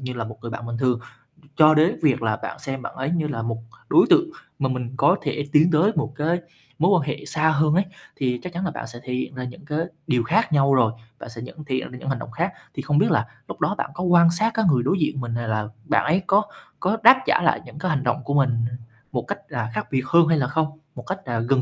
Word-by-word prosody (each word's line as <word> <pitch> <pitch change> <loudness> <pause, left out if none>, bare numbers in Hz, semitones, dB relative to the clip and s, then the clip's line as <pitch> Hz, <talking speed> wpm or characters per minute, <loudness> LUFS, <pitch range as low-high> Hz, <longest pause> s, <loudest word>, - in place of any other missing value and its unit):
như 130 -1 -5
là 120 -2 -4
một 110 0 -9
người 115 - -6
bạn 115 +1 -6
bình 120 0 -4
thường, 125 -2 +1 0.6
cho 155 0 +7
đới 155 +4 +4
việc 135 -6 +3
là 110 -1 +1
bạn - - -7
xem 135 -3 -5
bạn - - -7
ấy 135 +2 -2
như 165 -3 0
là 135 -6 -4
một 115 0 -3 0.3
đối 345 - +6
tượng 350 -1 +5 0.3
mà 135 -2 0
mình 125 -1 -4
có 180 - +4
thể 145 - -2
tiến 160 +3 +5
tới 170 +7 +4
một 150 -3 -1
cái 165 +4 0 0.4
mối 175 +5 +4
quan 145 -2 -3
hệ 150 - -5
xa 155 +2 +1
hơn 155 0 +2
ấy 190 +2 +3 0.3
thì 125 -2 -1
chắc 180 -1 -7
chắn 180 +3 -3
là 175 - -1
bạn - - -6
sẽ 120 +1 -10
thể 125 - -5
hiện 130 +2 -3
ra 130 - -5
những 125 +3 -9
cái 150 +1 -2 0.3
điều 125 -2 +2
khác 190 - +1
nhau 140 -1 +4
rồi. 115 -4 +3 0.3
Bạn - - -9
sẽ 115 0 -9
nhận 155 +6 -9
thể 135 -2 -2
hiện 130 - -3
ra 125 - -9
những 135 - -5
hành 135 - -1
động - - -8
khác. - - -2 0.2
Thì - - -4
không - - 0
biết - - +3
là - - +2 0.2
lúc - - -8
đó - - +1
bạn - - -3
có 175 - -5
quan 170 -2 +5
sát 215 +7 +1
cái 225 - +1
người 125 -2 +2
đối 185 +9 +1
diện 150 -3 0
mình 120 -1 -4
này 120 0 -3
là 110 -1 -1 0.2
bạn - - +2
ấy 175 +6 +2
có 200 +2 +5 0.4
có 195 +5 0
đáp 260 +3 +8
trả - - +3
lại 170 - +2
những 145 - -11
cái 185 +3 -1
hành 140 -3 0
động 130 +2 -1
của 140 - -3
mình 135 -3 +3 0.6
một - - -1
cách - - -3
là 120 -2 -3
khác - - -3
biệt 130 -2 0
hơn 170 +1 +5
hay 165 0 +3
là 135 -4 +1
không, 155 +2 -2 0.2
một - - -8
cách, 190 +1 -5
à, 120 -3 -2
gần 130 +3 +2
145 Hz, 285 wpm, -23 LUFS, 125-170 Hz, 0.6 s, đáp